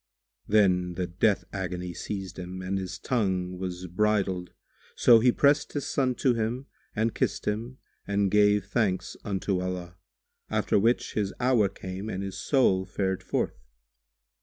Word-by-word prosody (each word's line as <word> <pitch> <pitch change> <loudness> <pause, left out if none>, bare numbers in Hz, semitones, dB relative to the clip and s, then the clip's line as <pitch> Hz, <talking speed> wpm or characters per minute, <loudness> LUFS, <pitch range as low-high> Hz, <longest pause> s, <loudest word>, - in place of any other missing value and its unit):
Then 90 -4 +3
the 90 - -1
death 95 +4 +1
agony[FN#142] 90 -2 -4
seized 95 -3 -5
him 90 +1 -6
and 95 +1 -1
his 90 -1 -5
tongue 95 -6 -1
was 90 -1 -4
bridled; 95 -1 0 0.5
so 115 -2 +7
he 125 +2 +5
pressed 145 +3 +3
his 145 -2 -2
son 130 -3 0
to 125 +1 +2
him 115 +3 -2 0.3
and 110 +1 +1
kissed - - -1
him 115 +5 -2 0.3
and 100 -1 +1
gave 105 -1 +4
thanks 95 -4 -1
unto 95 -2 -1
Allah; 90 -1 -5 0.5
after - - +2
which 115 +4 +1
his 100 -2 -1
hour 120 -5 +3
came 95 +2 -6
and 95 -2 -3
his 95 -1 -5
soul 110 -10 +3
fared 95 -1 -1
forth. - - -2
100 Hz, 150 wpm, -27 LUFS, 90-110 Hz, 0.5 s, so